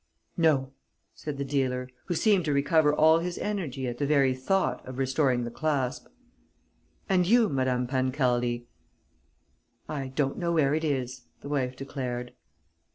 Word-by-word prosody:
"No," 150 -6 +2 0.4
said 150 -2 -6
the 140 - -2
dealer, 130 -2 -1 0.2
who 175 - -2
seemed 200 -1 +3
to 150 - +1
recover 150 +2 +3
all 160 +2 +5
his 175 +1 -4
energy 150 -11 -3
at 120 0 -5
the 145 - 0
very 140 -3 +3
thought 160 +10 0
of 130 0 -7
restoring 130 -1 +1
the 120 - -5
clasp. 140 -3 -1 1.0
"And 180 -3 +2
you, 230 +1 +5
Madame 130 -3 0
Pancaldi." 125 -2 0 1.2
"I 140 -3 -4
don't 135 +1 -1
know 170 -1 0
where 145 -4 +3
it 160 +1 0
is," 130 -5 -2 0.2
the 140 - -8
wife 130 -3 -1
declared. 125 -3 -5
140 Hz, 150 wpm, -28 LUFS, 130-155 Hz, 1.2 s, all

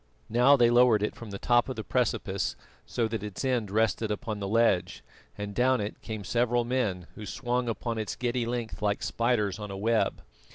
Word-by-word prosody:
Now 125 +5 +5
they 120 -2 +5
lowered 120 -3 +5
it 105 - -1
from 115 - -9
the 100 - -5
top 120 +4 +2
of 130 - -3
the 110 - -4
precipice 110 -6 -1 0.3
so 115 -2 0
that 110 -2 -3
its 105 +4 -5
end 120 -6 0
rested 110 +1 +1
upon 105 0 -3
the 100 - -3
ledge, 95 -6 +2 0.3
and 105 0 -5
down 125 +3 +3
it 105 +1 -5
came 110 -2 -5
several 120 +3 +1
men, 110 -8 -1
who 110 - -9
swung 125 +2 -1
upon 115 0 -3
its 110 - -3
giddy 120 -1 -1
length 120 -2 -4
like 105 -1 0
spiders 105 0 0
on 105 -1 -6
a 100 - -5
web. 115 +3 +1
115 Hz, 200 wpm, -28 LUFS, 105-120 Hz, 0.3 s, Now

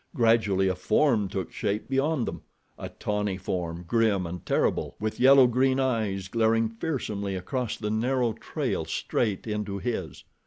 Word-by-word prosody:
Gradually 110 -6 +3
a 95 - +2
form 105 +3 +2
took 95 -2 -4
shape 105 +1 -2
beyond 135 0 0
them—a - - -9
tawny 105 -2 -2
form, 90 -2 -4
grim 110 -5 +2
and 85 0 -6
terrible, - - 0
with 110 +1 -3
yellow 135 0 +7
green 130 +2 +2
eyes 110 -8 0
glaring 115 +1 +2
fearsomely 110 -6 -3
across 115 +6 -3
the 105 -1 -3
narrow 120 +1 +1
trail - - -3
straight 105 -5 -1
into 105 -2 -3
his. 100 -7 -4
110 Hz, 145 wpm, -27 LUFS, 95-125 Hz, -, yellow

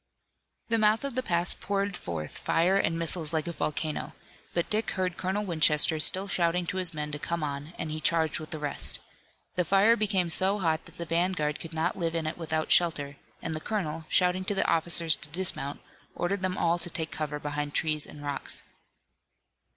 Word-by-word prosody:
The 230 0 +2
mouth 215 +3 +3
of 280 -2 -2
the 255 - 0
pass 175 -7 +1
poured 200 0 -2
forth 80 - -5
fire 175 +4 +2
and 165 -4 +1
missiles 165 -1 0
like 155 -1 0
a 170 - -3
volcano, 155 0 -3 0.4
but 170 - 0
Dick 215 +1 0
heard 185 -1 0
Colonel 195 +3 -2
Winchester 155 -2 +4
still 190 +5 +3
shouting 175 -1 +1
to 180 - -3
his 180 -2 +2
men 150 -2 -4
to 145 - -5
come 170 +1 -3
on, 145 +2 -4
and 155 - -4
he 155 0 -4
charged 160 -2 +2
with 155 - -8
the 160 - -2
rest. 145 -1 +2 0.5
The 180 - +1
fire 200 +6 +5
became 195 -6 +1
so 190 +4 +4
hot 165 -5 0
that - - -15
the 170 - -4
vanguard 165 -2 0
could 165 - -8
not 165 +4 -1
live 165 -1 -1
in 165 -1 -1
it 155 - -2
without 160 -1 -2
shelter, 145 -5 +3 0.3
and 165 - -2
the 155 - -2
colonel, 165 -7 -3
shouting 180 0 +3
to 205 - 0
the 195 - +1
officers 165 0 +4
to 150 - -10
dismount, 150 -4 -2 0.3
ordered 185 +2 -1
them 185 0 -1
all 170 +1 +2
to 175 - -4
take 160 -1 -3
cover 150 -1 -3
behind 145 0 -4
trees 155 -2 +1
and 145 - -11
rocks. 140 -1 -3
165 Hz, 200 wpm, -28 LUFS, 155-185 Hz, 0.5 s, fire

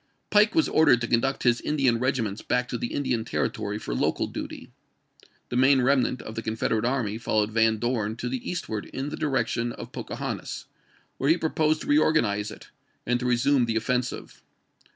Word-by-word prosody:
Pike 210 +1 +4
was 320 - +4
ordered 155 -6 +5
to 120 - -1
conduct 130 +4 +1
his 120 -1 +3
Indian 135 -6 +1
regiments 115 -5 -1
back 125 0 0
to 120 - -2
the 120 - -2
Indian 125 -5 -1
Territory 105 -2 -2
for 85 - -5
local - - 0
duty. - - -7 0.8
The - - -4
main 135 +2 +5
remnant 130 -1 +2
of 110 - -7
the 115 - -4
Confederate 110 0 -1
army 120 -4 -1
followed 110 -2 0
Van 110 0 +3
Dorn 110 -2 -1
to 120 - -4
the 125 0 -4
eastward 110 -12 -4
in 135 +2 -4
the - - -5
direction 130 -4 -1
of - - -9
Poca - - -6
hontas, - - -5 0.5
where 135 - +1
he 165 - +5
proposed 155 -1 +1
to - - -7
reorganize 115 -9 +2
it, 105 - -12 0.4
and 125 0 +1
to 125 - -2
resume 125 +2 +3
the 115 -1 -2
offensive. 125 +2 -2
125 Hz, 185 wpm, -26 LUFS, 115-135 Hz, 0.8 s, ordered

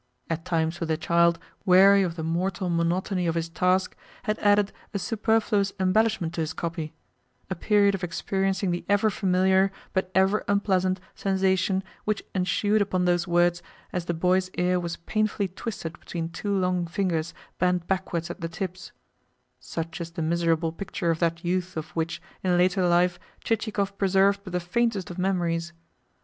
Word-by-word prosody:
at 165 0 -2
times 165 -1 -1
when 165 - -2
the 160 -1 0
child, 170 +1 +3 0.3
weary 195 +1 +7
of 175 -3 -1
the 160 - -4
mortal 175 +2 -1
monotony 175 +2 0
of 165 - 0
his 165 0 -1
task, 185 +2 +1 0.3
had 215 0 -1
added 205 0 +3 0.2
a - - +3
superfluous 215 -2 +1
embellishment 190 -2 +2
to 170 - -2
his 160 0 -2
copy; 165 -2 -4 0.6
a - - 0
period 200 +2 +3
of 195 -1 -4
experiencing 190 +2 -1
the 175 - -2
ever 205 +2 +3
familiar, 190 0 +3 0.2
but 190 -1 0
ever 190 +2 +3
unpleasant, 190 -2 +1
sensation 190 0 +1 0.2
which 215 -1 -1
ensued 205 +3 +1
upon 185 -2 +1
those 175 0 +2
words 175 0 +3 0.3
as 180 -2 -2
the 175 - -1
boy's 185 +2 +2
ear 180 0 +2
was 170 -1 -4
painfully 215 +2 -1
twisted 180 -4 -6
between 165 -2 -4
two 200 +4 -2
long 180 -2 0
fingers 170 -3 -1 0.2
bent 180 -1 +1
backwards 175 -2 -2
at 175 - -9
the 165 - -3
tips 185 +2 -6 0.7
such 165 +7 -5
is 170 - -4
the 165 -1 -4
miserable 165 0 +1
picture 170 -1 -2
of 160 - -2
that 165 0 0
youth 180 0 -1
of 155 0 -4
which, 165 -1 -2 0.2
in 180 -1 +2
later 180 +1 +3
life, 175 +1 +3 0.2
Chichikov 210 -3 -1
preserved 195 +1 +3
but 190 - -8
the 180 - +1
faintest 200 +1 -1
of 175 - -7
memories! 170 -3 0
180 Hz, 165 wpm, -26 LUFS, 170-195 Hz, 0.7 s, weary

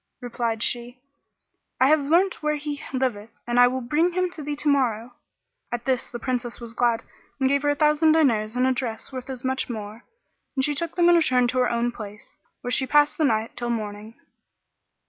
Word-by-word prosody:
Replied 235 -2 -2
she, 245 +1 -2 0.8
"I 260 - +5
have 310 +1 +5
learnt 370 +4 +2
where 300 0 0
he 295 -1 -5
liveth 250 -5 -2 0.2
and 240 0 +1
will 260 0 -3
bring 305 +8 +1
him 365 0 0
to 320 - -8
thee 295 0 -3
tomorrow." 255 -6 +1 0.6
At 240 0 -4
this 260 -2 0
the 240 - -5
Princess 245 0 -3
was 235 -1 -7
glad 230 -1 +1 0.4
and 265 - +2
gave 280 +1 +2
her 290 - +1
a 290 - +2
thousand 300 +1 +4
diners 230 -8 +2
and 250 +1 +2
a 260 - +3
dress 245 -1 -4
worth 255 0 -7
as 255 -2 -6
much 260 0 -1
more, 215 0 -7 0.5
and 265 -1 +2
she 295 - 0
took 330 +3 -3
them 345 -1 +4
and 345 0 +6
returned 250 -6 +3
to 255 - -1
her 250 - +3
own 235 +1 0
place, 210 -3 -10 0.3
where 245 - -4
she 265 +1 +1
passed 295 +2 +3
the 310 - +3
night 220 -3 0
till 240 0 -3
morning. 215 -1 -4
255 Hz, 205 wpm, -24 LUFS, 235-295 Hz, 0.8 s, and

